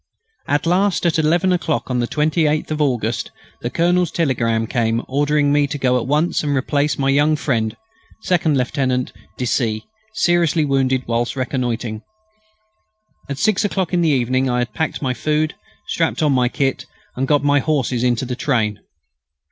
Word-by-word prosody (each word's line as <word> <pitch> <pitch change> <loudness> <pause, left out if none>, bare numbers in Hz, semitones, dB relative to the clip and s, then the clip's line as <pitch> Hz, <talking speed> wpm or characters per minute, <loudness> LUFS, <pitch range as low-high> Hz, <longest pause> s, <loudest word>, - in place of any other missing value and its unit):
At 145 +1 0
last, 185 +2 +1
at 165 -1 +2
eleven 175 +4 +2
o'clock 160 -6 -1
on 125 - 0
the 120 - 0
28th 155 +1 0
of 155 0 -1
August, 120 -5 -1 0.3
the 120 - -2
colonel's 175 +5 +2
telegram 115 -9 0
came 115 0 0
ordering 145 +1 +1
me 145 0 +3
to 145 - -4
go 125 -2 +1
at 120 - -5
once 150 +5 +1
and 145 -1 0
replace 140 0 0
my 135 -1 0
young 145 +3 +3
friend, 120 -7 -1 0.5
Second 160 -5 +2
Lieutenant 125 0 -1 0.3
de 125 - -2
C., 115 -3 -1 0.3
seriously 170 -4 +2
wounded 130 -2 +1
whilst 120 +2 -1
reconnoitring. 120 -4 -2 1.3
At 140 - -3
six 215 +5 +2
o'clock 190 -4 -1
in 175 - +2
the 165 - +3
evening 130 -1 +1
I 125 - 0
had 125 0 -2
packed 160 -2 -2
my 130 -1 0
food, 155 +3 0 0.3
strapped 165 -1 -1
on 150 - +3
my 125 -2 +2
kit, 135 0 -1 0.3
and 135 +1 -1
got 145 0 +2
my 145 0 +3
horses 135 -5 0
into 125 0 +1
the 125 0 -3
train. 110 -6 0
140 Hz, 170 wpm, -19 LUFS, 125-155 Hz, 1.3 s, me